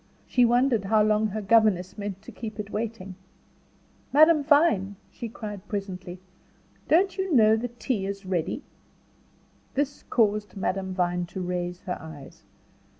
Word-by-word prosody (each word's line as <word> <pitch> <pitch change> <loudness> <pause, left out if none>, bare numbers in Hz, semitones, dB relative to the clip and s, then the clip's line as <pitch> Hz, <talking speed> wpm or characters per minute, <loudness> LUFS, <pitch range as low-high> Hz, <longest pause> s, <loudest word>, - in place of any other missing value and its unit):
She 250 -1 +3
wondered 240 -3 +2
how 215 +1 +4
long 215 0 +2
her 215 +1 -4
governess 200 -4 +3
meant 200 -1 -6
to - - -10
keep 220 -2 -7
it 205 -1 -5
waiting. 215 -3 -4 1.0
"Madame 310 +1 +6
Vine," 280 - +3 0.4
cried 210 -3 -6
she 205 - -31
presently, 185 -3 -5 0.7
"don't 375 +4 +3
you 380 -1 -1
know 220 -6 +6
that 240 +1 -5
tea 215 -6 -1
is 200 0 -6
ready?" 180 -4 -2 1.1
This 285 +1 -1
caused 210 -3 +1
Madame 190 -1 -2
Vine 180 -1 0
to 190 - -6
raise 180 0 -3
her 180 - -4
eyes. 155 -4 -11
210 Hz, 145 wpm, -26 LUFS, 190-235 Hz, 1.1 s, Madame